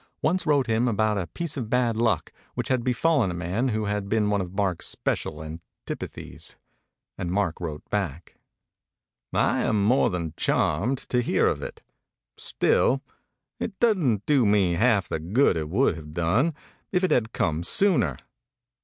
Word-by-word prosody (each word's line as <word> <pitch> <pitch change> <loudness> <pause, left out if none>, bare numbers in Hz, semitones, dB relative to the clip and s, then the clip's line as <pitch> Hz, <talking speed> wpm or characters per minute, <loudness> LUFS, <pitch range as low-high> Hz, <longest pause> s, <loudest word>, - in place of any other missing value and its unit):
once 170 +3 +1
wrote 145 -3 +3
him 115 +1 +1
about 110 -1 +1
a 90 - -3
piece 160 - -3
of 120 -5 -4
bad 120 -2 +2
luck 115 0 0 0.2
which - - -3
had 130 -2 +1
befallen 130 - +2
a 85 - -4
man 90 +9 -1
who 110 -3 -1
had 105 -1 -2
been 105 -1 +2
one 100 -1 +1
of 90 0 -7
Mark's 95 -4 0
special 75 +1 -2
antipathies; 80 +2 -8 0.6
and 90 - -2
/k 95 -2 +1
wrote 80 -4 -6
back: 85 -6 -3 1.0
I - - +2
am 105 -2 +1
more 125 +4 +4
than 85 -5 -3
charmed 110 - +1
to 125 - +2
hear - - +2
of - - +1
it; - - -8 0.5
still, 135 +1 +1 0.6
it 195 - -4
d 170 - +2
do 140 -4 +4
me 100 -4 +3
half 105 0 +2
the - - -2
good 95 - +2
it 80 -2 -3
would 100 +1 +2
have 75 -1 -10
done 110 - +1 0.4
if 180 0 +1
it 185 - +2
had 115 -1 +2
come 80 -6 0
sooner. 90 - +2
105 Hz, 165 wpm, -25 LUFS, 90-125 Hz, 1.0 s, more